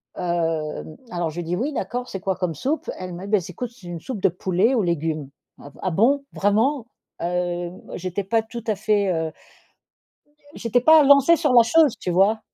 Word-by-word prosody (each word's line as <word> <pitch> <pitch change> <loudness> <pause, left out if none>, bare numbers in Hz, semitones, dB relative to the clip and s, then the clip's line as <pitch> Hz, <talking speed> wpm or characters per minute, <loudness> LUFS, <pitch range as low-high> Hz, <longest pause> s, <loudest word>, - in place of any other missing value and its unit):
Hem, 165 -3 -2 0.2
alors 175 -2 -1
je 160 - -10
lui 175 - -2
dis: 170 +2 -2
«Oui 280 +9 -2
d'accord. 250 -1 -4
C'est 195 - -5
quoi 190 0 -1
comme 180 -4 -2
soupe?», 285 - -2
elle 185 -1 -6
me: 185 +3 -7
«Bah 210 0 +3
s 180 -1 -5
écoute 240 +7 -5
c'est 200 -7 -15
une 170 -1 -6
soupe 215 +1 -6
de - - +4
poulet 185 +7 +1
aux 225 -6 +2
légumes. 155 -4 -2 0.3
"Ah 140 - -11
v - - -20
ah 185 - -1
bon? 270 - +3
Vraiment?"». 225 +6 +1 0.3
Hem, 175 0 -3
j'étais 185 +2 -3
pas 225 +3 +1
tout 235 0 -8
à 215 - +1
fait, 205 -2 +1
heu 160 -2 -1 1.2
j'étais 235 +1 +1
pas 315 +1 +7
lancée 280 +4 +6
sur 295 -4 +1
la 235 -1 +8
chose, 300 +2 +4
tu 180 - -3
vois? 200 +5 +3
195 Hz, 205 wpm, -23 LUFS, 175-240 Hz, 1.2 s, la